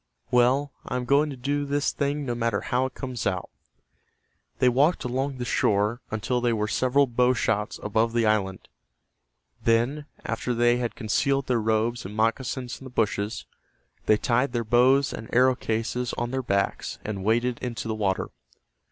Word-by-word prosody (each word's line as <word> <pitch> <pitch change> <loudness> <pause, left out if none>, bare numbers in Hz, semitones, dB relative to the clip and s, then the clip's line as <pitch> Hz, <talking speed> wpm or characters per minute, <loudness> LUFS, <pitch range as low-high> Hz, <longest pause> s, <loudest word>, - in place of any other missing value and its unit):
Well, 130 +4 +3
I - - -5
am 125 0 -2
going 145 +4 +3
to 140 - -6
do 145 +3 -1
this 145 +1 0
thing 145 0 -2
no 120 - -1
matter 115 -1 0
how 125 +2 0
it - - -14
comes 130 -4 -4
out." 90 -2 -2 1.1
They 125 - +3
walked 140 +8 +3
along 130 +2 -2
the 125 - -4
shore 105 +2 +1
until 120 +3 -1
they 120 -1 +2
were 105 -1 0
several 130 +5 +2
bow 125 0 +2
shots 105 -1 -1
above 110 +2 +1
the 120 -1 +2
island. 100 -3 0 1.0
Then, 120 +6 +1 0.2
after 125 - -2
they 120 +1 +3
had 120 -1 -3
concealed 135 +4 0
their 120 -3 +1
robes 110 +2 0
and 100 +3 -8
moccasins 120 +3 -1
in - - -10
the - - -7
bushes, 110 -2 -1 0.6
they 110 - +5
tied 125 +5 +1
their 120 -1 0
bows 130 +5 +4
and 110 - -8
arrow 130 +1 +5
cases 120 +1 -2
on 120 0 -3
their 130 0 -1
backs 100 -5 -1
and 100 -3 -4
waded 120 +3 +1
into 120 -2 -4
the 110 - -1
water. 100 -3 -1
120 Hz, 175 wpm, -26 LUFS, 110-130 Hz, 1.1 s, they